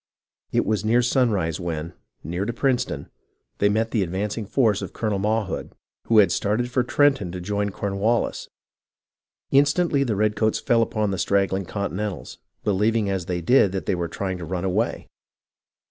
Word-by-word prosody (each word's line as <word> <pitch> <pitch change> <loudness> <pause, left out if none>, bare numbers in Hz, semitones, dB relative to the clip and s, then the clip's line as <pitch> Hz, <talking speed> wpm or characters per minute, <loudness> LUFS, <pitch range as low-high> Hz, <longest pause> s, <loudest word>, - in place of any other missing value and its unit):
It - - +1
was 110 -1 0 0.2
sunrise 105 - +1
when, 85 -1 -4 0.3
near 85 +5 -3
to 120 - -1
Princeton, 130 +1 -1 0.5
they 100 - +4
met 110 +2 0
the 110 - +1
advancing 100 +4 -2
force 110 -4 +2
of - - -6
Colonel 105 -3 -1
Mawhood, 105 -1 -1 0.3
who 115 - +4
had 100 -5 +6
started 120 +5 0
for 125 - +2
Trenton 130 -7 +2
to 90 - -5
join 100 +3 -1
Cornwallis. 100 +3 -1 1.0
Instantly 140 +1 +3
the 115 -6 -1
redcoats 110 +1 +1
fell 115 -1 +2
upon 110 -2 0
the 95 - -3
straggling 100 -1 +1
Continentals, 100 +1 -4 0.2
believing 105 +1 +1
as 95 -3 -3
they 90 -1 -2
did 100 0 +4
that 95 -5 -3
they - - +1
were 85 -2 -2
trying 95 +2 -4
to - - -6
run 90 +2 -3
away. 100 +5 -1
105 Hz, 160 wpm, -24 LUFS, 95-115 Hz, 1.0 s, had